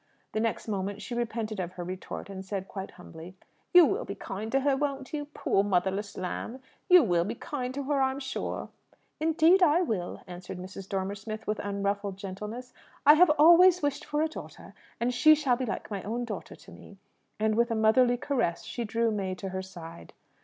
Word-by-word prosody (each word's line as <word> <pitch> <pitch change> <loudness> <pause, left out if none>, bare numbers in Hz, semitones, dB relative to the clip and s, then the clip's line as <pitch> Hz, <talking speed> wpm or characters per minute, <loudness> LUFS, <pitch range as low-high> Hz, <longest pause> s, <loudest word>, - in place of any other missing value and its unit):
The 215 - -1
next 225 0 -1
moment 200 -1 -3
she 245 - -7
repented 225 -3 -3
of 180 -1 -4
her 180 - -6
retort, 185 +2 -6
and 195 -1 -7
said 190 0 -4
quite 195 -1 -6
humbly, 180 0 -12 0.4
"You 355 -2 +9
will 410 +10 0
be - - -6
kind 215 +3 -6
to 270 - +2
her, 275 0 +2
won't 275 -1 -3
you? 295 -1 -2
Poor 240 -8 0
motherless 195 +1 -1
lamb! 205 +7 -4 0.3
You 360 -3 +8
will 175 -6 +2
be 215 +6 -4
kind 255 -3 -4
to 280 - -3
her, 280 0 0
I'm 265 +1 +1
sure!" 265 -1 -4 0.5
"Indeed 325 +4 +4
I 345 +1 +5
will," 200 - -3
answered 180 0 -8
Mrs. 185 +1 -9
Dormer 195 0 -2
Smith, 215 +2 -7
with 215 0 -2
unruffled 200 -1 -2
gentleness. 210 +6 -7 0.3
"I 295 - +10
have 340 +2 +6
always 345 +3 +7
wished 285 -1 -1
for 295 +1 -1
a - - +2
daughter, 315 - -10 0.3
and 240 +1 0
she 310 +5 +6
shall 280 -5 +1
be 255 0 -3
like 215 - -5
my 200 -2 -3
own 235 +5 -3
daughter 210 -5 -7
to - - -16
me." 200 - -14 0.4
And, 215 0 +2
with 235 +2 +2
a 230 - 0
motherly 240 +3 +4
caress, 245 -11 -1
she 240 - -4
drew 230 +1 0
May 195 -3 -2
to 190 +1 -6
her 190 0 -3
side. 165 - -11
220 Hz, 205 wpm, -28 LUFS, 195-275 Hz, 0.5 s, I